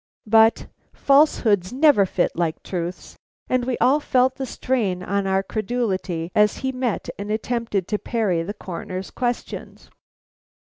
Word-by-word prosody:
But 225 +1 +4 0.3
falsehoods 235 - +3
never 260 -7 +4
fit 180 - 0
like 165 -2 -2
truths, 175 -1 -5 0.3
and 255 -1 0
we 255 -1 -1
all 275 +4 +3
felt 260 -3 +2
the 265 0 -5
strain 215 -9 -1
on 200 +1 -1
our 190 0 +1
credulity 190 -7 -2
as 210 -1 +3
he 265 - +1
met 255 -3 -2
and 200 +1 -5
attempted 220 -3 -2
to 210 - 0
parry 210 -8 0
the 200 +6 -5
Coroner's 185 0 -6
questions. 245 -1 -4
210 Hz, 140 wpm, -22 LUFS, 185-250 Hz, 0.3 s, But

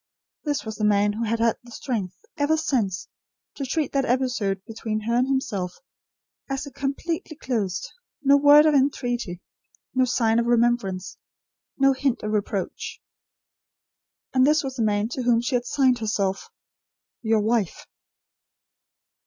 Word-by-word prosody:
This 290 -4 -1
was 220 -1 -5
the 215 - -3
man, 205 0 +3
who 230 +2 -2
had 230 +1 0
had 230 0 +2
the 245 - -15
strength, 215 -7 -4 0.2
ever 295 +2 +2
since, 210 - -1 0.5
to 280 - -5
treat 285 +2 -1
that 275 -1 +1
episode 235 -7 0
between 220 -1 -4
her 230 +2 -2
and 250 +2 +3
himself, 205 -9 -2 0.7
as 275 +1 -3
completely 310 +4 -3
closed; 200 -10 -2 0.4
no 280 0 +6
word 290 +1 +7
of 310 - +4
entreaty; 245 -9 0 0.5
no 255 0 +3
sign 230 -2 +2
of 235 - 0
remembrance; 230 -6 +1 0.6
no 275 0 +4
hint 265 -2 -1
of 210 - -2
reproach. 205 -2 -3 1.3
And 255 - +4
this 300 +2 +4
was 265 -1 -4
the 230 - +1
man 210 0 +1
to 255 - -4
whom 240 -1 +3
she 245 +3 -2
had 245 0 0
signed 260 -3 +2
herself: 205 - -1 0.7
"Your 220 -2 +2
wife." 215 -4 0
240 Hz, 145 wpm, -24 LUFS, 210-270 Hz, 1.3 s, word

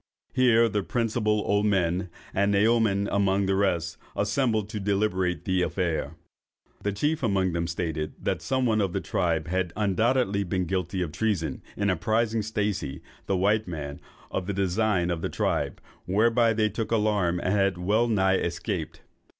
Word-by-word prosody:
Here 120 -3 +5
the 105 -2 -1
principal 110 -1 0
old 105 +1 +2
men, 90 -2 +1 0.2
and 100 +1 +2
Naoman 105 -1 +3
among 100 0 +2
the 95 - +1
rest, 85 -4 0 0.2
assembled 110 0 +1
to 105 - -4
deliberate 95 -3 0
on - - -22
the 95 -1 +1
affair. 85 -4 -1 0.7
The 105 - -1
chief 150 +10 0
among 95 -6 +1
them 85 0 -1
stated 80 -3 -3
that - - -2
some 130 -1 0
one 110 -2 +2
of 95 -3 -1
the - - 0
tribe 85 -3 0
had 90 0 -1
undoubtedly 105 +1 +1
been 90 0 -1
guilty 90 +1 -1
of 80 - -5
treason, 100 -3 -1 0.2
in 100 -1 +1
apprising 110 +5 +1
Stacey, 105 -10 -2 0.2
the 95 - +1
white 105 +3 +2
man, 70 -4 -6 0.3
of 95 - -3
the 100 - -1
designs 95 -1 +1
of 85 -2 -2
the - - -2
tribe, - - -1 0.3
whereby 115 +4 +3
they 110 -1 +2
took 115 +1 -3
the 115 - +2
alarm, 105 -5 +1
and 90 - 0
had 100 -2 +2
well 105 +7 +2
nigh 95 -4 +3
escaped. 85 0 -3
100 Hz, 170 wpm, -26 LUFS, 90-110 Hz, 0.7 s, Here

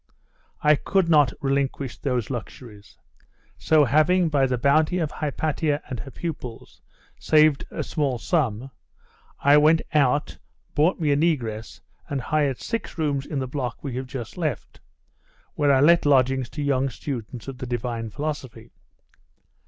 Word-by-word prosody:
I 150 - +6
could 190 +1 +1
not 150 -5 +5
relinquish 135 -1 -1
those 125 -3 -2
luxuries. 110 -3 -9 0.6
So 155 -2 +4
having, 155 +6 +3
by 140 -3 +2
the 125 -1 -1
bounty 155 +7 +2
of 160 -4 -1
Hypatia 150 0 -1
and 130 -4 -4
her 120 - -7
pupils, 135 -7 -7 0.4
saved 155 -2 +3
a - - -4
small 140 -5 -1
suns, 130 - -1 0.7
I 145 +1 +6
went 155 +2 +4
out 145 -1 +1 0.3
bought 160 +6 +2
me 155 -3 +1
a - - +4
negress, 125 -9 -1 0.3
and 140 - -2
hired 140 0 0
six 230 -6 -5
rooms 145 -4 -1
in 150 - -4
the 130 -1 -2
block 125 -3 -4
we 140 -4 -4
have 130 0 -4
just 125 +3 -7
left, 155 -8 -4 0.7
where 145 -1 +2
I 135 -1 +4
let 170 +1 +5
lodgings 130 -2 +3
to 145 - -1
young 135 -1 +1
students 125 -3 -6
of 135 -2 -7
the 130 - -5
Divine 120 -2 -3
Philosophy. 130 -2 -6
140 Hz, 150 wpm, -24 LUFS, 125-155 Hz, 0.7 s, I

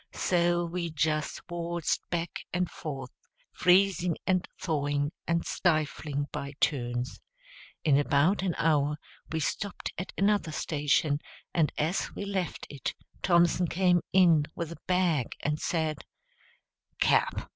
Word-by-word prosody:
So 175 -1 +2
we 170 0 -3
just 155 -1 -1
waltzed 170 -1 -1
back 170 -1 -2
and 180 0 0
forth, 135 -7 -6 0.4
freezing, 180 -2 +3
and 185 -1 +1
thawing, 145 -3 0 0.2
and 170 0 +1
stifling, 155 -3 0
by 140 0 -5
turns. 120 -2 0 0.6
In 145 -3 +4
about 145 +7 +3
an 185 -3 -1
hour 150 -2 +2 0.3
we 160 - 0
stopped 195 +5 -3
at 180 - -5
another 200 -4 +2
station; 145 -1 +1 0.3
and 160 -3 +2
as 160 +5 -1
we 200 - -4
left 190 -4 -3
it 140 -3 -4 0.3
Thompson 175 0 +4
came 180 0 +3
in 170 -5 +5
with 170 -1 -4
a 170 - -10
bag, 175 -8 +1
and 150 +1 -1
said, 160 -3 -1 1.0
"Cap. - - +2
165 Hz, 125 wpm, -29 LUFS, 150-180 Hz, 1.0 s, in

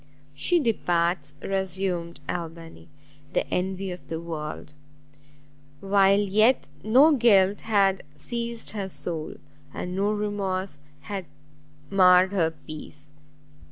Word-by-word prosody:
"She 345 - +1
departs," 170 - 0
resumed 190 -3 -1
Albany, 165 - -6 0.4
"the - - 0
envy 190 +1 -2
of 180 - -9
the 160 0 -4
world! 155 -3 -6 1.1
while 195 0 +4
yet 215 - +3
no 260 +9 +6
guilt 205 -5 +4
had 195 -3 +2
seized 235 - -4
her 200 -3 -4
soul, 165 -4 -5 0.4
and 180 0 -5
no 200 +2 +1
remorse 195 -5 -2 0.2
had 190 +4 -5 0.7
marred 185 -1 +6
her 175 -5 +2
peace. 150 -1 -10
190 Hz, 105 wpm, -25 LUFS, 170-205 Hz, 1.1 s, no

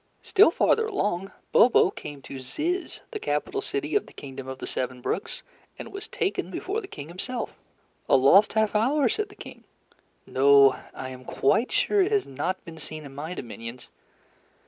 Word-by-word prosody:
Still 410 -2 +6
farther 445 +6 +2
along, 200 - -1 0.2
Bobo 230 -5 +6
came 145 -2 -9
to 135 - -8
Zizz, 325 - -3
the 430 - -4
capital 420 -1 -1
city 415 - -3
of 415 - +1
the - - -15
Kingdom 135 -1 -8
of 130 0 -5
the - - -6
Seven 130 0 -3
Brooks, - - -3 0.3
and - - -8
was 400 +2 -6
taken 470 -5 -2
before 415 +4 -3
the 385 - -9
King 145 - -8
himself. 235 +9 -4 0.5
"A - - +6
lost 140 +11 +6
half 220 -1 +2
hour?" 260 +6 +3
said 420 - -1
the 405 - -15
King. - - -11 0.6
"No, 140 0 +6 0.2
I 130 - -5
am 130 0 -9
quite 220 - +1
sure 415 - +3
it 380 +3 +2
has 415 -2 +2
not 180 +8 -3
been 165 -2 -10
seen 155 0 -7
in 135 - -10
my 155 +6 -5
dominions. 115 -1 -8
190 Hz, 180 wpm, -26 LUFS, -, 0.6 s, Still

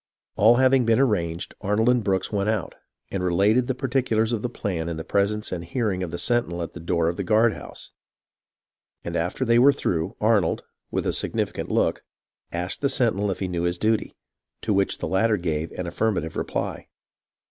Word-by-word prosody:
All 110 +3 +6
having 130 0 +4
been 115 +1 +3
arranged, 90 -9 0
Arnold 105 +3 +1
and 125 -2 +3
Brooks 95 -2 0
went 100 0 0
out, 110 -6 -1 0.4
and 95 -2 -2
related 100 +8 +3
the 130 - -1
particulars 125 -4 0
of 110 - -1
the 125 - -2
plan 85 -8 -3
in 85 - -4
the 80 - -5
presence 100 +5 0
and 85 -2 -3
hearing 95 +1 -1
of 90 - -3
the 85 - -5
sentinel 100 -7 0
at - - -7
the - - -8
door 85 0 0
of 85 - -1
the 100 - -2
guard 110 +4 +3
house; - - -10 1.1
and - - -5
after 90 +10 -1
they 115 0 +4
were 135 +3 +7
through, 80 - -2
Arnold, 105 -6 +2 0.3
with - - -2
a - - 0
significant - - -2
look, - - +1 0.5
asked 90 +1 -3
the 140 - +2
sentinel 110 -6 +1
if 95 - -3
he 95 - 0
knew 90 -1 -2
his 85 0 0
duty, 110 +3 0 0.5
to 110 - +1
which 95 0 +1
the - - -4
latter 105 +3 +2
gave 80 -3 -2
an 90 - -4
affirmative 85 -2 -1
reply. - - -3
100 Hz, 195 wpm, -24 LUFS, 85-115 Hz, 1.1 s, were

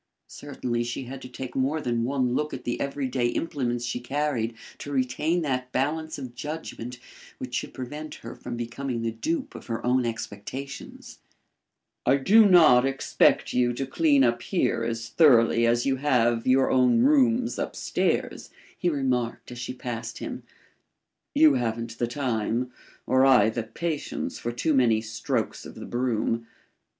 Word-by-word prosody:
Certainly 125 -4 -3
she 120 +2 -4
had 130 +2 -8
to 125 - -9
take 130 0 -7
more 135 +4 +1
than 120 -5 -1
one 130 -1 0
look 150 +3 -1
at - - -9
the 120 - -3
every 140 -1 -2
day 125 -1 0
implements 120 -4 -2
she 120 0 -3
carried 125 -3 -1 0.2
to 145 - -7
retain 145 +6 0
that 130 -3 -2
balance 155 +5 -1
of 130 -4 -7
judgment 125 -3 -6 0.4
which 125 -1 -7
should - - -2
prevent 150 +5 -7
her - - -6
from 120 - -7
becoming 120 +1 -4
the 115 - 0
dupe 310 - -3
of - - -10
her 115 0 -3
own 125 +1 +3
expectations. 120 +4 -6 0.8
"I 140 - +4
do 205 +10 +6
not 155 -9 +7
expect 135 0 +2
you 120 -1 +2
to 135 +3 -3
clean 140 0 +3
up 120 -1 +2
here 180 - 0
as 115 0 -3
thoroughly 115 -6 +5
as 120 +1 +2
you 135 -1 +1
have 120 -4 +2
your 130 +1 +4
own 130 - +4
rooms 255 -4 +3
up - - -3
stairs," - - -1 0.3
he 180 - 0
remarked, 130 -6 -1
as 120 - -8
she 120 - -4
passed 125 -2 -5
him. - - -6 0.9
"You 155 -2 +7
haven't 115 -2 -2
the 120 - +1
time, 120 -1 -1 0.3
or 130 0 +3
I 125 -5 +6
the 115 - -2
patience 150 +8 -4
for 120 - -3
too 150 +7 0
many 115 -5 +3
strokes 110 0 -3
of - - -10
the - - -8
broom. 115 -2 -1
125 Hz, 165 wpm, -26 LUFS, 120-145 Hz, 0.9 s, not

